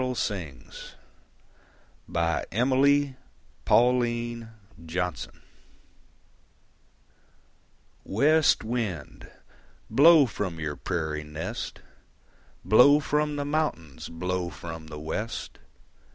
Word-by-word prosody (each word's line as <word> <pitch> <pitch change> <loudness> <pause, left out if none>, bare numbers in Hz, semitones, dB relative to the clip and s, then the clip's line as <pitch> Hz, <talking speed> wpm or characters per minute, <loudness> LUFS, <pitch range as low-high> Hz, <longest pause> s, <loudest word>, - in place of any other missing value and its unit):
THE 130 0 -1
SONG 95 - -4 1.4
MY 130 +11 +1 0.5
PADDLE 125 +1 +4
SINGS 110 -7 -5 2.8
West 150 +9 +3
wind, 110 - -4 0.6
blow 150 +5 +7
from 95 -8 -4
your 75 -2 -3
prairie 80 -4 -3
nest, 75 +1 -6 0.8
Blow 140 +7 +7
from 150 0 0
the 145 -1 -2
mountains, 145 - -2
blow 90 +1 -3
from 80 -2 -8
the 75 -1 -8
west. 90 +9 -5
110 Hz, 75 wpm, -27 LUFS, 85-135 Hz, 2.8 s, blow